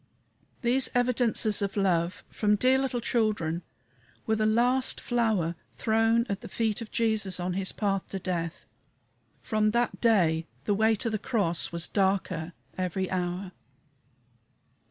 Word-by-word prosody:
These 250 +2 +3
evidences 245 -3 +2
of 200 0 -2
love 180 -1 +1
from 210 -1 +2
dear 255 +5 +3
little 260 -3 -1
children 210 -9 0 0.6
were 220 - +1
the 215 0 +1
last 245 +4 +2
flower 220 -9 0 0.2
thrown 225 +1 +2
at 200 -3 -3
the - - -8
feet 225 0 -1
of 225 - -7
Jesus 220 -5 +1
on 180 0 -2
his 190 0 -1
path 195 -2 -1
to 195 - -5
death. 175 -3 -3 0.8
From 215 -2 +1
that 235 +2 0
day 170 -8 +3 0.2
the 205 - +2
way 220 +2 +3
to 230 +2 -2
the 215 - -1
cross 200 -8 0
was 170 0 -2
darker 190 -4 0 0.3
every 185 +1 -2
hour. 180 +1 -2
210 Hz, 140 wpm, -28 LUFS, 185-230 Hz, 0.8 s, These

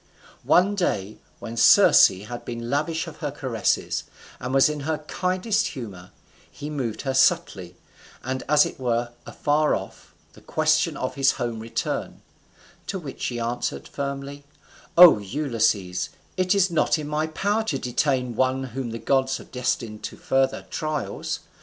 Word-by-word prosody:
One 190 +3 +4
day 110 - -2 0.2
when 115 - -7
Circe - - +7
had 105 +6 -8
been 120 0 -5
lavish 160 +4 0
of 165 - -10
her 150 - -3
caresses, 130 -5 -1 0.3
and 125 - -4
was 135 0 +5
in 150 -1 -3
her 155 +2 -2
kindest 185 +7 -1
humour, 100 - -8 0.4
he 150 +1 -8
moved 125 -7 -3
her 135 -2 -1
subtly, 95 -9 +1 0.5
and 130 0 -3
as 150 0 +6
it - - -7
were 120 -1 -1 0.2
afar 150 +1 +1
off, - - -9 0.2
the - - -17
question 155 0 +1
of 130 - -3
his 135 -1 +3
home 120 -3 -3
return; 115 +1 -4 0.6
to 195 - -3
which 150 -7 -8
she 120 -1 -2
answered 120 +1 -3
firmly, 140 0 -5 0.5
"O 170 -10 +10
Ulysses, 105 -6 -1 0.3
it 185 +1 +2
is 190 -2 +3
not 165 - +2
in 150 -1 -5
my 150 +1 -1
power 205 +7 0
to 150 -10 -1
detain 125 -1 -1
one 130 +2 +1
whom 130 -1 -5
the 115 - -5
gods 130 +3 +1
have - - -14
destined 115 -4 -2
to - - -7
further 135 0 0
trials. 155 -1 -3
135 Hz, 155 wpm, -24 LUFS, 120-155 Hz, 0.6 s, O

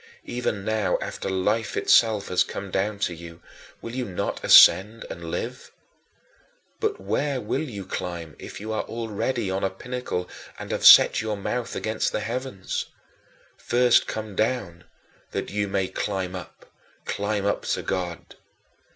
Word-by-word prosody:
Even 115 -5 -3
now 110 -2 +1
after - - -5
Life 105 +3 0
itself 110 -3 +4
has 90 - +3
come 100 -1 -7
down 100 +3 -1
to 95 -3 -1
you, 85 0 -11 0.4
will 115 - -6
you 130 0 -2
not 95 -4 -4
ascend 105 +4 +7
and 85 -1 -7
live? 125 +9 -5 1.1
But 430 -2 -1
where 140 -2 -1
will 105 - -2
you 105 -11 -6
climb 85 -4 -5
if - - -9
you 110 +2 -5
are 110 - 0
already 115 -1 -2
on 95 +1 -2
a 95 - +2
pinnacle 95 -3 -4 0.3
and - - -7
have - - +4
set - - +9
your 110 -1 -2
mouth 120 +4 -3
against 110 0 -1
the - - -2
heavens? 115 -3 -4 0.7
First 120 0 +3
come 110 -2 -5
down 100 -7 -1 0.5
that - - -3
you 100 0 -1
may 95 -1 0
climb 95 -2 -3
up, 90 - -11 0.3
climb 100 0 -2
up 100 - 0
to - - -1
God. 90 -3 -4
105 Hz, 150 wpm, -25 LUFS, 95-115 Hz, 1.1 s, set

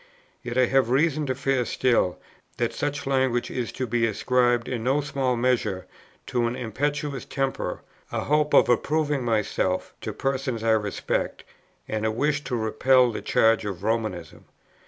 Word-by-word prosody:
Yet 120 0 -5
I 130 - +5
have 135 -1 +2
reason 150 +3 +2
to 130 - -1
fear 135 -1 +1
still, 120 -7 +1 0.4
that - - -1
such 145 0 -3
language 130 -3 +1
is 125 -2 -3
to 130 - -2
be 115 0 +1
ascribed, 120 +2 +1
in 120 -3 -3
no 135 +4 +2
small 135 -3 -1
measure, 120 -6 0 0.4
to 120 -1 0
an 120 - -3
impetuous 140 +4 -2
temper, 135 -1 -3 0.3
a - - -1
hope 150 0 +2
of - - +6
approving 145 +3 +1
myself 105 -5 0
to - - -4
persons 130 -4 -2
I 115 - +3
respect, 105 -2 -1 0.4
and 110 0 -2
a 110 - +2
wish 145 +6 0
to 125 - -2
repel 120 +3 +3
the - - -5
charge 110 0 +3
of 100 -3 -5
Romanism." 110 -8 -3
125 Hz, 160 wpm, -25 LUFS, 115-135 Hz, 0.4 s, of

